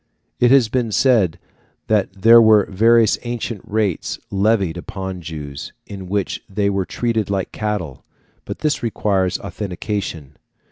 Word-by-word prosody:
It 120 - +4
has 130 -3 +5
been 120 0 -1
said 105 -8 +3 0.5
that 100 -2 -1
there 115 +1 +8
were 110 -2 +5
various 115 +2 +4
ancient 120 -3 -4
rates 105 -5 -1
levied 100 -3 +1
upon 95 +1 -6
Jews, 75 -4 -7
in 95 -2 -9
which 100 -1 -2
they 100 0 0
were 95 -1 -1
treated 115 -2 -2
like 95 -2 -2
cattle, 105 -10 -4 0.4
but - - -7
this 150 -1 0
requires 100 -5 0
authentication. 95 -7 -5
100 Hz, 135 wpm, -20 LUFS, 95-110 Hz, 0.5 s, there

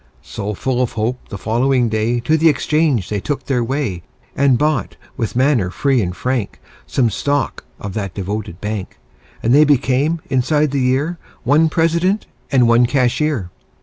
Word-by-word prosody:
So, 105 +1 -5
full 125 +4 -1
of 125 - -1
hope, 115 +3 -3
the 100 - -6
following 120 +4 +1
day 110 +2 0
To 155 +7 +2
the 160 +1 +4
exchange 150 - +1
they 105 - -2
took 135 +5 -3
their 125 -3 0
way 120 -8 -2 0.3
And 135 -2 +3
bought, 150 0 0 0.2
with 115 -3 -3
manner 130 -7 +2
free 135 +5 +1
and 90 -3 -3
frank, 125 -5 -2 0.3
Some 120 -4 +1
stock 145 +4 -1
of 100 -2 -6
that 100 -4 -4
devoted 100 -2 -4
bank; 105 -6 -5 0.5
And 115 - +3
they 150 +2 +7
became, 145 +2 +2
inside 145 +3 +1
the 140 -1 0
year, 140 +7 0 0.2
One 150 +6 +4
President 170 +5 +1 0.3
and 125 -4 +4
one 120 +1 +5
Cashier. 130 - 0
125 Hz, 165 wpm, -18 LUFS, 110-145 Hz, 0.5 s, they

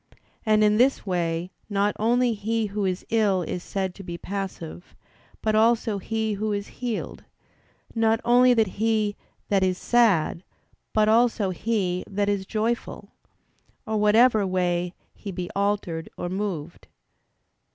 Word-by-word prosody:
And 215 0 +4
in 210 0 +4
this 255 +1 +3
way 175 -1 -1 0.2
not 205 0 +1
only 240 +2 +2
he 220 +1 -1
who 205 0 -2
is 185 -1 -2
ill 205 -5 +2
is 175 - -4
said 190 0 -3
to 195 - -11
be 175 -2 -6
passive, 185 -3 -6 0.5
but 215 - +1
also 220 -1 +2
he 220 +2 -2
who 215 +1 -2
is 200 0 -2 0.2
healed; 240 -3 -4 0.7
not 225 -1 +2
only 245 +1 +5
he 215 +1 0 0.3
that 200 -2 +3
is 185 -1 +1
sad, 200 -9 +2 0.5
but 215 -1 +3
also 220 -3 +3
he 185 -2 -1
that 205 0 0
is 195 -2 -1
joyful; 225 +2 -2 0.7
or 220 0 -1
whatever 215 0 +4
way 180 -1 0 0.2
he 200 - -7
be 180 -1 -5
altered 200 -5 -1
or 175 - -3
moved. 185 -5 -4
205 Hz, 140 wpm, -25 LUFS, 185-220 Hz, 0.7 s, only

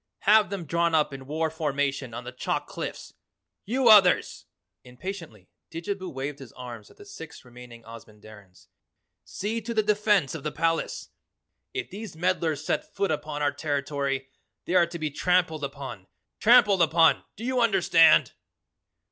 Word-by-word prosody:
Have 215 +1 +5
them 195 -4 -5
drawn 170 +1 +1
up 150 -2 +1
in 135 -1 -9
war 160 +2 -1
formation 140 -4 -2
on 120 +2 -7
the 125 - -7
chalk 125 - -3
cliffs. - - -7 0.5
You 250 +4 +1
others!" 205 -5 +5 0.4
impatiently 125 - -9 0.2
Didjabo 185 +3 -5
waved 140 +2 -5
his 135 - -11
arms 120 -4 -9
at - - -21
the 410 - -14
six 160 - -11
remaining 120 -1 -13
Ozamandarins, 105 -4 -14 0.6
"See 220 +3 -4
to 230 +2 -5
the 215 - +3
defense 210 -8 +2
of 160 - -6
the 150 - -3
palace! 165 +1 -2 0.6
If - - -5
these 200 -2 -8
meddlers 160 -3 -1
set - - -3
foot 200 -3 0
upon 150 -1 -3
our 145 - +2
territory 140 -2 -3 0.4
they - - -3
are 175 -2 +5
to 170 - -7
be 155 -2 -3
trampled 165 -1 +1
upon, 135 -8 -7 0.3
trampled 215 -5 +5
upon 165 0 +4
do 220 - -10
you 255 -1 0
understand?" 175 -7 +5
160 Hz, 155 wpm, -26 LUFS, 135-190 Hz, 0.6 s, Have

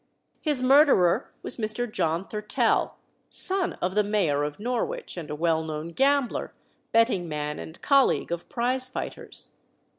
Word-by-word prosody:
His 290 -5 0
murderer 265 - +4
was - - -2
Mr. 220 +1 -1
John 175 -6 -1
Thurtell, 210 0 0 0.3
son 375 -1 +1
of 180 +1 0
the 210 +1 +3
Mayor 195 -9 +1
of 145 +3 -4
Norwich, 250 - -3
and 170 -4 -7
a 150 - -3
well 160 0 +1
known 155 +1 -5
gambler, 270 +5 +1 0.4
betting 225 -7 +2
man, 150 0 -3
and 160 - -9
colleague 275 -10 +3
of 170 0 -4
prize 255 +2 0
fighters. - - -3
210 Hz, 145 wpm, -26 LUFS, 165-255 Hz, 0.4 s, murderer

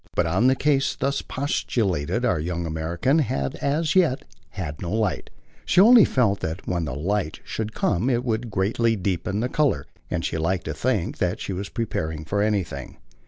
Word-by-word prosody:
But - - +2
on 95 +9 +2
the 130 - +4
case 140 0 +1
thus 140 +1 -1
postulated 110 - -1
our 115 - +2
young 85 +2 -3
American 85 - 0
had 70 - -1
as 155 +4 0
yet 165 -9 +3 0.2
had 75 -5 -6
no 85 - -3
light: 110 -3 -1 0.3
she 180 - +3
only 225 +1 +8
felt 105 -6 +2
that 80 +3 -4
when 85 -2 -1
the 65 - -4
light 90 +2 -1
should 110 0 -4
come 100 +7 +1
it 120 -1 +1
would 115 0 -1
greatly 115 +4 +1
deepen 95 +1 -2
the 125 - +1
colour; 135 - +1 0.2
and 85 -1 -2
she 80 - -2
liked 85 +3 -1
to - - -3
think - - -1 0.2
she 95 - -4
was 95 +2 -4
prepared 80 -9 -3
for 100 +4 0
anything. 95 -10 -2
100 Hz, 180 wpm, -24 LUFS, 85-125 Hz, 0.3 s, only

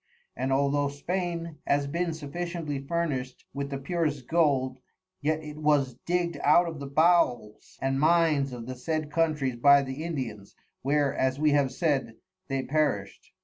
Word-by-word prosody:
And 135 - -2
although 140 +1 +2
Spain 170 +2 -3
has 140 0 +2
bin 170 +4 -1
sufficiently 160 -1 -4
furnished 140 -4 -3
with 140 0 -3
the 140 - -3
purest 145 -2 -2
Gold, 135 -6 +2 0.4
yet 155 +2 0
it 150 0 -8
was 145 -4 +2
dig'd 175 -1 0
out 170 +4 +5
of 160 -3 -6
the 140 - -6
Bowels 140 -8 +1
and 135 0 +1
Mines 155 -3 +3
of 120 -2 -7
the 130 - -5
said 155 +4 -3
Countries 150 -6 0
by 140 +3 +6
the 135 +3 -5
Indians, 125 -12 -5 0.3
where 140 0 +1
(as 130 0 +1
we 150 0 +3
have 140 -2 +2
said) 135 -6 0 0.3
they 135 -1 -1
perished. 140 -11 -1
145 Hz, 155 wpm, -28 LUFS, 135-160 Hz, 0.4 s, by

